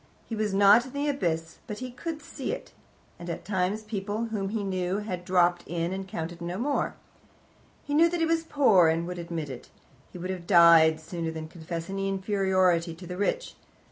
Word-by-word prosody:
He 225 - -5
was 215 -1 -1
not 200 +4 +6
in 260 - -12
the 285 +1 -1
abyss, 165 - -2
but 210 - -5
he 255 +1 -6
could 305 +4 -6
see - - -5
it, - - -6 0.5
and 175 0 -7
at 170 - -5
times 195 +2 -1
people 210 +1 -3
whom 195 -2 -1
he 215 0 -2
knew 185 -1 -1
had 185 -4 -4
dropped 175 -1 +3
in, 170 +1 -2
and 190 0 -5
counted 170 -1 -5
no 175 +2 -4
more. 280 +6 -1 0.9
He 290 - -4
knew 330 +3 +5
that 350 0 -2
he 330 - +3
was 325 0 +2
poor, 260 - +4
and 165 +1 +1
would 180 0 -5
admit 165 -4 -4
it: 125 - -10 0.4
he - - -9
would 185 +2 -4
have 180 -2 -6
died 170 -3 +7
sooner 165 +1 -4
than 160 -1 -6
confess 165 0 -6
any 195 0 -2
inferiority 190 -4 +1
to 180 +2 -11
the 180 +1 -6
rich. 205 - -1
185 Hz, 205 wpm, -27 LUFS, 170-215 Hz, 0.9 s, died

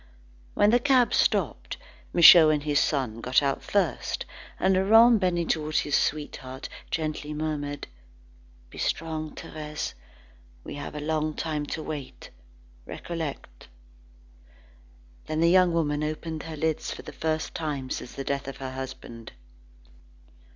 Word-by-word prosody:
When 205 +1 +4
the 245 - +5
cab 255 -2 +3
stopped, - - 0 0.3
Michaud 170 -2 +9
and 150 -1 +1
his 145 -1 +2
son 125 -8 -1
got 125 +4 +2
out 140 -1 0
the - - -13
first, 195 -5 0 0.3
and 190 +1 +3
Laurent 225 +5 +6
bending 175 -3 0
towards 155 -1 0
his 145 - 0
sweetheart 135 -3 -2 0.2
gently 155 -1 -3
murmured: 145 -2 -3 0.9
"Be - - -10
strong, 155 -1 -2
Thérèse. 150 0 -6 0.7
We - - -8
have 145 +1 -7
a - - -4
long 155 0 -1
time 150 -2 -3
to 155 - -4
wait. 145 -4 -7 0.6
Recollect." 165 -4 -6 1.6
Then 155 0 -2
the 170 +1 +4
young 185 -1 +5
woman 150 -3 0
opened 155 +1 -4
her 155 - -6
lips 160 0 -1
for - - -7
the - - -9
first 160 0 -2
time 145 -5 -4
since 125 - -5
the 135 - -4
death 140 0 -3
of 135 -1 -6
her 130 -1 -6
husband. 130 -3 -8
155 Hz, 140 wpm, -26 LUFS, 145-165 Hz, 1.6 s, Michaud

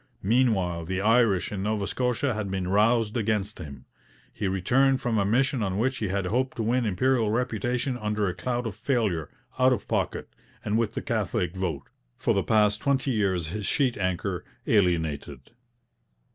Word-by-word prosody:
Meanwhile, 95 -7 +1
the 95 +2 -2
Irish 110 -3 +3
in 100 -2 -3
Nova 105 0 -1
Scotia 125 +5 0
had 105 -2 -3
been 95 -1 -2
roused 110 +2 +2
against 105 -2 -1
him. 70 -4 -9 0.5
He 100 - -2
returned 130 +9 +2
from 115 -3 0
a 100 - +2
mission 125 +4 +1
on 95 -2 -1
which 130 +3 0
he 110 - -1
had 95 0 -1
hoped 125 +7 0
to 115 - -1
win 120 +1 +1
Imperial 115 +3 +2
reputation 125 +2 -1
under 105 -1 -1
a 90 - -1
cloud 125 +3 -2
of 110 -4 -4
failure, 105 - -1 0.3
out 130 0 +5
of - - -4
pocket, - - -1 0.4
and 105 - 0
with 115 -2 0
the - - -3
Catholic 100 - -1
vote, 85 -7 -2 0.3
for - - +1
the - - +2
past 105 -1 +2
twenty 135 -1 +1
years 95 -7 0
his 105 +2 -3
sheet 130 -4 +1
anchor, 90 -3 -2 0.2
alienated. 80 - 0
105 Hz, 175 wpm, -26 LUFS, 95-120 Hz, 0.5 s, out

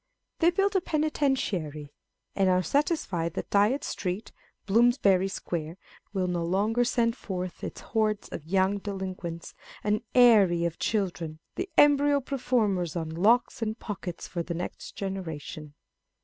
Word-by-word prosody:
They 335 - +5
build 390 +3 +1
a 380 - +4
Penitentiary, 255 - -1 0.4
and 195 -1 +3
are 185 0 +3
satisfied 185 - 0
that - - -5
Dyot 210 +7 +3
Street, 185 +3 -4 0.3
Bloomsbury 205 -3 +4
Square,1 170 -3 -4 0.3
will 190 -2 0
no 175 -1 -1
longer 205 +7 +1
send 235 -1 +1
forth 185 -6 -5
its - - -6
hordes 215 -2 0
of - - -6
young 190 +2 +2
delinquents, 185 -4 -5 0.2
" - - -17
an 210 0 +1
aerie 205 -9 +6
of 170 0 -3
children," 175 -7 -1 0.2
the 370 +2 -4
embryo 290 0 +5
performers 230 - 0
on 160 -2 -3
locks 220 +10 +2
and 220 0 -2
pockets 190 -6 -6
for 170 - -3
the 170 0 -4
next 175 - -6
generation. 160 -6 -6
195 Hz, 140 wpm, -28 LUFS, 175-240 Hz, 0.4 s, aerie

